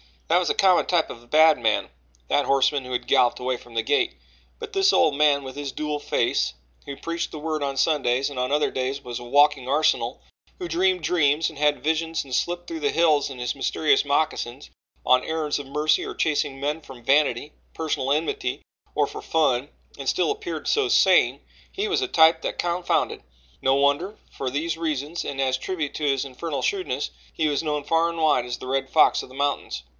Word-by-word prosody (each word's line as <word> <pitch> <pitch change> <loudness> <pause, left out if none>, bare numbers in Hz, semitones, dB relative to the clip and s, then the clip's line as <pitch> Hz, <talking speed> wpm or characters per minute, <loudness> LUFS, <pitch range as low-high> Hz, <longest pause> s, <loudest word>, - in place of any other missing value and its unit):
That 170 +2 +4
was 180 - -1
a - - +1
common 185 -2 +4
type 175 -3 +1
of 115 - -8
the 120 - -21
bad 155 +1 +5
man, 110 -2 0 0.4
that 145 - +2
horseman 135 0 +2
who 125 - -6
had 125 0 -2
galloped 120 - +3
away 125 0 -2
from 120 - -16
the 115 -1 0
gate 145 - +1 0.4
but 455 -1 -7
this 390 0 +3
old 155 - +4
man 145 -1 +3
with 130 +1 -9
his 145 -2 -5
dual 150 -1 -3
face, - - 0 0.3
who 140 - -6
preached 170 +3 -4
the - - -7
Word 155 0 -3
on 140 -1 -2
Sundays 135 -4 +1
and 140 -3 -6
on 125 +1 -1
other 150 +1 +1
days 130 +2 -3
was 120 -1 -5
a 120 - -10
walking 145 0 +3
arsenal; 150 +4 +1 0.4
who 355 -2 -6
dreamed 370 +1 +1
dreams 155 -2 +2
and 155 -3 -12
had 145 -3 +1
visions 160 +1 -1
and 135 -2 -10
slipped 175 +6 -1
through 165 -1 -5
the 145 -2 0
hills 155 -4 +2
in 135 - -8
his 125 -1 -2
mysterious 145 +2 +1
moccasins 140 -2 -2 0.3
on 125 0 +4
errands 155 -2 -2
of 140 - -8
mercy 150 +3 +1
or - - -6
chasing 145 -3 -1
men 145 +3 -2
from 130 -5 -13
vanity, 140 0 +2 0.2
personal 150 -4 -2
enmity 150 -4 -1 0.3
or - - +3
for - - -8
fun, 145 -4 +1 0.3
and - - -6
still - - +1
appeared 430 +1 -5
so 430 -2 +2
sane - - +4 0.3
he 415 +2 -2
was 410 - +1
a 390 - 0
type 160 - +5
that - - -4
confounded. 175 0 -1 0.4
No 135 0 +3
wonder 145 +9 +1
for 135 - -4
these 155 +5 -2
reasons 155 0 -3
and 135 -1 -3
as 130 -1 +1
a - - -19
tribute 160 -5 -3
to 155 - -5
his 135 -2 +1
infernal 140 +3 -5
shrewdness 385 -2 -2 0.2
he 155 - 0
was 145 - 0
known 150 -2 -2
far 165 +2 +2
and 170 - -6
wide 155 -6 +2
as 125 0 -4
the 130 - -9
Red 135 +1 -1
Fox 155 - +4
of - - -11
the 130 - -14
Mountains. 140 - -2
145 Hz, 210 wpm, -24 LUFS, 135-160 Hz, 0.4 s, bad